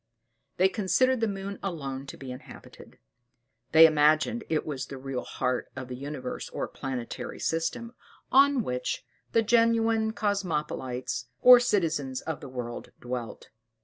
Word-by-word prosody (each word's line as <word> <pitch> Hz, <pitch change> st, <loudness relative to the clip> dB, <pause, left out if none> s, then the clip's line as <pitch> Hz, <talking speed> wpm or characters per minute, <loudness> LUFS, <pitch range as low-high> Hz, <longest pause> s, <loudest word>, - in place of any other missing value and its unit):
They 185 Hz, -, +5 dB
considered 225 Hz, +7 st, +2 dB
the 225 Hz, -, +1 dB
moon 200 Hz, 0 st, -5 dB
alone 140 Hz, -7 st, -4 dB
to -, -, -8 dB
be 135 Hz, -2 st, -8 dB
inhabited: 125 Hz, +1 st, -12 dB, 0.7 s
they 160 Hz, 0 st, +9 dB
imagined 155 Hz, +9 st, +3 dB
it 155 Hz, -2 st, 0 dB
was 140 Hz, -3 st, -4 dB
the 135 Hz, -, -7 dB
real 130 Hz, -1 st, -4 dB
heart 125 Hz, -1 st, -2 dB
of 130 Hz, -1 st, -7 dB
the 125 Hz, -, -5 dB
universe 140 Hz, +1 st, -6 dB
or -, -, -3 dB
planetary 130 Hz, -3 st, -5 dB
system, 165 Hz, +9 st, -2 dB, 0.4 s
on 275 Hz, -2 st, +5 dB
which 125 Hz, -5 st, -3 dB, 0.3 s
the 230 Hz, -, +4 dB
genuine 225 Hz, -1 st, +3 dB
Cosmopolites, 150 Hz, -, -2 dB, 0.2 s
or 250 Hz, -1 st, +10 dB
citizens 160 Hz, -, 0 dB
of 160 Hz, -2 st, -4 dB
the 140 Hz, -, -9 dB
world, 120 Hz, -2 st, -6 dB
dwelt. 125 Hz, -1 st, -6 dB
155 Hz, 140 wpm, -28 LUFS, 130-220 Hz, 0.7 s, or